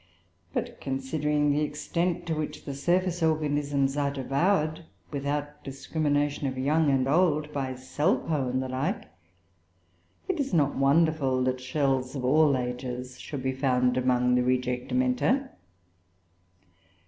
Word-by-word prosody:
But - - -4
considering 145 +2 0
the 145 +1 +1
extent 170 +4 -1
to 165 - -1
which 155 -1 -4
the 140 - -4
surface 175 +5 0
organisms 145 -3 +1
are 145 -1 +1
devoured, 155 +4 0 0.3
without 145 +1 -3
discrimination 145 +1 -1
of 130 -1 -4
young 150 +4 +2
and 135 -1 +2
old, 155 -1 +2
by 130 -2 -2
Salpoe 145 +1 0
and 130 +1 0
the - - -4
like, 130 +3 -2 1.2
it 375 -4 -1
is 275 -9 0
not 145 -3 +2
wonderful 135 -2 +2
that 130 0 -1
shells 130 -1 0
of 130 -2 -3
all 145 +1 +4
ages 125 0 -5
should 140 -4 -6
be 130 - +1
among 125 -1 +2
the 125 - +4
rejectamenta. 245 - +1
140 Hz, 125 wpm, -27 LUFS, 130-155 Hz, 1.2 s, all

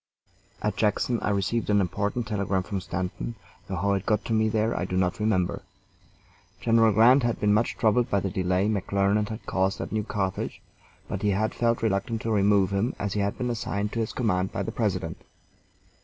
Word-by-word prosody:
At - - -1
Jackson 110 +3 +1
I - - 0
received 105 +3 0
an 105 -1 +4
important 100 +5 -1
telegram 100 -4 -1
from 100 0 -4
Stanton, 90 +6 -4 0.3
though 95 - -3
how 100 +2 +1
it 95 -1 -1
got 105 -1 +1
to 115 - -1
me 110 0 +3
there 110 +1 0
I - - -1
do 90 0 -2
not 90 +1 0
remember. 105 -5 0 1.0
General 115 -1 +4
Grant 120 +6 +6
had 120 -1 0
been 105 0 +3
much 110 +3 +1
troubled 120 +1 +2
by 100 - +2
the 95 0 -3
delay 95 +1 +1
McClernand 100 0 +1
had 110 +1 -7
caused 95 +1 0
at - - -5
New 110 -1 0
Carthage, 95 -3 -3 0.5
but - - -4
he 105 - +2
had 105 +3 0
felt 115 -1 0
reluctant 110 +2 -1
to 115 - -1
remove 100 -2 +3
him 100 +6 0
as 100 -1 -3
he 105 - -1
had 100 0 -1
been 125 -1 -1
assigned 105 -2 -2
to 115 - -3
his 110 - -1
command 95 -6 0
by - - -2
the - - -4
President. - - -2
105 Hz, 200 wpm, -26 LUFS, 95-110 Hz, 1.0 s, Grant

